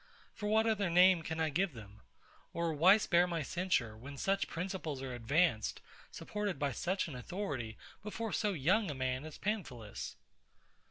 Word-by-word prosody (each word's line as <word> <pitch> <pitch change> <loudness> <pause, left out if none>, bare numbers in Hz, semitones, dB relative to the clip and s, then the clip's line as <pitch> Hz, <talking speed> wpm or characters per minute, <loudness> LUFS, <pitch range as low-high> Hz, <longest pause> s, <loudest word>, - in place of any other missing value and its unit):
For 210 -1 -3
what 220 +1 +4
other 210 -4 +1
name 180 0 +6
can 160 0 -4
I 160 -1 +1
give 180 +2 +1
them? 105 -1 -12 0.5
or, 170 -1 0
why 180 +7 +7
spare 175 -4 +3
my 170 -3 -2
censure, 145 - 0
when 140 +5 -9
such 195 +6 +1
principles 165 -5 -4
are 130 -1 -4
advanced, 120 0 +1 0.3
supported 205 -5 -3
by 140 0 0
such 185 +10 -1
an 155 - -7
authority, 130 - -4 0.2
before 215 +1 -4
so 210 -2 +1
young 185 +6 +2
a 145 - -3
man 130 +1 -2
as 155 - -8
PAMPHILUS? 135 - -4
170 Hz, 165 wpm, -34 LUFS, 135-195 Hz, 0.5 s, why